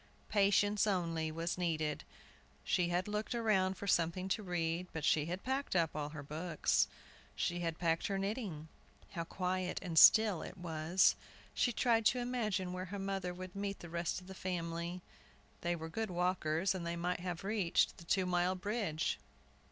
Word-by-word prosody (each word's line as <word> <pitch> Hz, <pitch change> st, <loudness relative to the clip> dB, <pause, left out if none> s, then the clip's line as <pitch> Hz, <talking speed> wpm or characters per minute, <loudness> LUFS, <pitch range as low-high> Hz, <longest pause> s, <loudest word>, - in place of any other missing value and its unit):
Patience 205 Hz, 0 st, +3 dB
only 165 Hz, -5 st, 0 dB
was 165 Hz, +3 st, -3 dB
needed. 155 Hz, -4 st, -1 dB, 0.6 s
She 175 Hz, -, +2 dB
had 180 Hz, +2 st, 0 dB
looked 210 Hz, +3 st, -2 dB
around 195 Hz, -5 st, +2 dB
for 200 Hz, -, -6 dB
something 175 Hz, 0 st, +1 dB
to 215 Hz, -, 0 dB
read; 175 Hz, -2 st, -1 dB
but 160 Hz, -2 st, -3 dB
she 155 Hz, -1 st, +3 dB
had 180 Hz, +3 st, -4 dB
packed 265 Hz, -3 st, -1 dB
up 165 Hz, -3 st, +2 dB
all 150 Hz, -1 st, -2 dB
her 150 Hz, -1 st, -7 dB
books. 150 Hz, -, +1 dB, 0.5 s
She 175 Hz, 0 st, -1 dB
had 165 Hz, -2 st, -2 dB
packed 165 Hz, -1 st, +1 dB
her 195 Hz, -, -1 dB
knitting. 195 Hz, -, -3 dB, 0.4 s
How 170 Hz, -3 st, -3 dB
quiet 185 Hz, +1 st, -2 dB
and 170 Hz, -4 st, +2 dB
still 215 Hz, -6 st, +7 dB
it 185 Hz, -, -8 dB
was! 170 Hz, +1 st, +2 dB, 0.4 s
She 245 Hz, -, +2 dB
tried 230 Hz, -2 st, +3 dB
to 255 Hz, -, +3 dB
imagine 215 Hz, -7 st, -1 dB
where 185 Hz, 0 st, -4 dB
her 200 Hz, +2 st, -6 dB
mother 195 Hz, -2 st, -2 dB
would 185 Hz, +1 st, -8 dB
meet 200 Hz, 0 st, -3 dB
the 170 Hz, -, -10 dB
rest 170 Hz, +1 st, -1 dB
of 180 Hz, -, -15 dB
the 190 Hz, -, -9 dB
family. 170 Hz, -1 st, -3 dB, 0.6 s
They 175 Hz, 0 st, 0 dB
were 160 Hz, -1 st, -6 dB
good 220 Hz, +6 st, -3 dB
walkers, 180 Hz, -1 st, +1 dB
and 185 Hz, -2 st, -4 dB
they 170 Hz, 0 st, -2 dB
might 175 Hz, +1 st, -1 dB
have 175 Hz, -1 st, -4 dB
reached 195 Hz, -4 st, +1 dB
the -, -, -10 dB
two 190 Hz, +2 st, +2 dB
mile 180 Hz, +1 st, +1 dB
bridge. 200 Hz, -5 st, -1 dB
180 Hz, 175 wpm, -35 LUFS, 165-195 Hz, 0.6 s, still